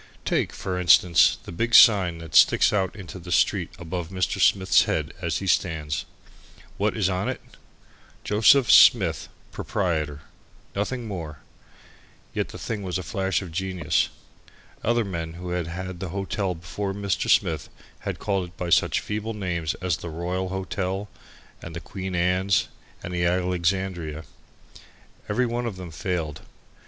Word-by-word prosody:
Take, -, -, 0 dB
for 90 Hz, -1 st, -4 dB
instance, 90 Hz, 0 st, +5 dB
the -, -, -9 dB
big 115 Hz, +7 st, 0 dB
sign 95 Hz, -6 st, +7 dB
that 80 Hz, -2 st, -10 dB
sticks 70 Hz, -, +5 dB
out 95 Hz, -3 st, 0 dB
into 95 Hz, -2 st, -9 dB
the 90 Hz, 0 st, -9 dB
street -, -, +2 dB
above 85 Hz, -1 st, -5 dB
Mr. 95 Hz, -1 st, -1 dB
Smith's 95 Hz, -1 st, +4 dB
head 75 Hz, -1 st, -2 dB
as 85 Hz, -5 st, -1 dB
he 100 Hz, -, -5 dB
stands. 80 Hz, -5 st, 0 dB, 0.7 s
What 105 Hz, +2 st, 0 dB
is 100 Hz, -4 st, +2 dB
on 95 Hz, 0 st, -1 dB
it? -, -, -3 dB, 0.8 s
"JOS. 110 Hz, +6 st, +5 dB
SMITH, 95 Hz, -, +5 dB, 0.2 s
PROP." 80 Hz, -7 st, -2 dB, 0.5 s
Nothing 115 Hz, +5 st, -2 dB
more, 85 Hz, -7 st, -5 dB
and -, -, -17 dB, 1.0 s
yet -, -, -1 dB
the -, -, -10 dB
thing 110 Hz, -3 st, -4 dB
was 95 Hz, -1 st, -3 dB
a 95 Hz, -, -5 dB
flash 95 Hz, +4 st, -1 dB
of 90 Hz, -, -9 dB
genius. 90 Hz, -2 st, 0 dB, 0.7 s
Other 120 Hz, 0 st, +2 dB
men 85 Hz, -4 st, -4 dB
who 90 Hz, +1 st, -7 dB
had 90 Hz, -2 st, -2 dB
had 90 Hz, +1 st, -6 dB
the 95 Hz, -1 st, -4 dB
hotel 95 Hz, 0 st, -2 dB
before 95 Hz, +5 st, -5 dB
Mr. 100 Hz, -3 st, -1 dB
Smith -, -, +2 dB, 0.3 s
had -, -, -4 dB
called 95 Hz, -2 st, -1 dB
it 90 Hz, -, -19 dB
by 90 Hz, -1 st, -4 dB
such -, -, +3 dB
feeble 105 Hz, +1 st, -4 dB
names 85 Hz, -5 st, -2 dB
as 90 Hz, -4 st, +1 dB
the 85 Hz, -, -7 dB
Royal 90 Hz, +3 st, -3 dB
Hotel 95 Hz, +1 st, -3 dB, 0.5 s
and 85 Hz, 0 st, -8 dB
the -, -, -4 dB
Queen's 95 Hz, 0 st, 0 dB, 0.3 s
and 90 Hz, -, -6 dB
the 85 Hz, 0 st, 0 dB
Alexandria. 90 Hz, -2 st, -1 dB, 1.1 s
Every 125 Hz, -, +1 dB
one 120 Hz, 0 st, -2 dB
of 110 Hz, -, -4 dB
them 90 Hz, -2 st, -8 dB
failed. 80 Hz, -2 st, -3 dB
90 Hz, 155 wpm, -25 LUFS, 85-100 Hz, 1.1 s, sign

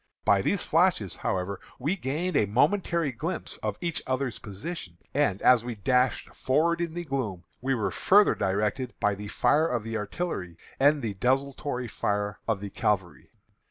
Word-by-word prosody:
By 100 Hz, -1 st, +5 dB
these 195 Hz, -, +1 dB
flashes, 165 Hz, -, +2 dB
however, 95 Hz, +1 st, -2 dB, 0.2 s
we 150 Hz, +9 st, 0 dB
gained 170 Hz, +2 st, -2 dB
a 105 Hz, -, +3 dB
momentary 170 Hz, -, +2 dB
glimpse 160 Hz, +10 st, -4 dB
of -, -, -3 dB
each 170 Hz, -2 st, -2 dB
other's 130 Hz, -3 st, -1 dB
position, 100 Hz, -, -7 dB, 0.2 s
and 140 Hz, -9 st, +2 dB
as 125 Hz, -3 st, +6 dB
we 120 Hz, -1 st, -4 dB
dashed 125 Hz, +4 st, +1 dB
forward 170 Hz, +6 st, +1 dB
in 170 Hz, -1 st, -3 dB
the 175 Hz, 0 st, -4 dB
gloom, 120 Hz, -, -3 dB, 0.2 s
we 135 Hz, +1 st, +1 dB
were 105 Hz, -5 st, -1 dB
further 205 Hz, -, +5 dB
directed 105 Hz, +6 st, -1 dB
by 105 Hz, -, +2 dB
the 105 Hz, +1 st, -7 dB
fire 155 Hz, +8 st, +3 dB
of 120 Hz, -6 st, -1 dB
the 115 Hz, 0 st, -3 dB
artillery 105 Hz, -, -4 dB, 0.2 s
and 145 Hz, +1 st, +4 dB
the 110 Hz, -3 st, -1 dB
desultory 130 Hz, +3 st, -1 dB
fire 105 Hz, -2 st, -2 dB
of 110 Hz, -4 st, 0 dB
the 100 Hz, -1 st, -6 dB
cavalry. 95 Hz, -4 st, -1 dB
125 Hz, 165 wpm, -27 LUFS, 105-155 Hz, 0.2 s, as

